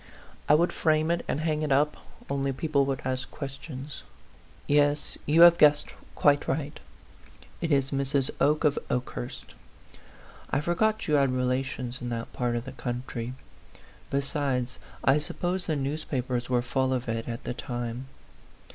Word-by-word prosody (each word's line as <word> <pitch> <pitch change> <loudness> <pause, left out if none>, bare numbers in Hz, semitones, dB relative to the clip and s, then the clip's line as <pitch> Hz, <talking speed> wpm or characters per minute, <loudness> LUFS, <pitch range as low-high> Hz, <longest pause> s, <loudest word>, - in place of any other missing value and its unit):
I 150 - +8
would 170 +3 +2
frame 155 0 +2
it 170 - 0
and 150 - -1
hang 155 -1 0
it 150 -2 -1
up, 145 +2 +3 0.3
only 140 0 0
people 140 0 +1
would 135 -2 -2
ask 130 0 -2
questions. 140 0 -7 0.6
Yes; 145 0 +2
you 155 +3 +5
have 170 0 +9
guessed 150 -1 +5 0.2
quite 145 -1 +3
right 145 +1 -2 0.8
it 165 -1 -1
is 135 -1 +2
Mrs. 135 -1 +1
Oke 150 +2 +3
of 150 -2 +3
Okehurst. 125 0 -4 1.0
I 135 - +1
forgot 210 +8 +1
you 155 - +1
had 140 -2 +4
re 130 0 0
lations 125 -1 -2
in 120 - -3
that 115 -1 -4
part 120 -1 -1
of 120 +1 -3
the 130 - -6
country; 125 -1 -4 0.7
besides, 140 -3 -1 0.2
I 135 +2 +5
suppose 175 +4 -2
the 160 - +1
newspapers 135 -4 -2
were 125 -1 +2
full 130 +1 +1
of 125 0 -3
it 115 0 -2
at 115 -1 -5
the - - -3
time. 120 0 -4
135 Hz, 155 wpm, -28 LUFS, 125-150 Hz, 1.0 s, have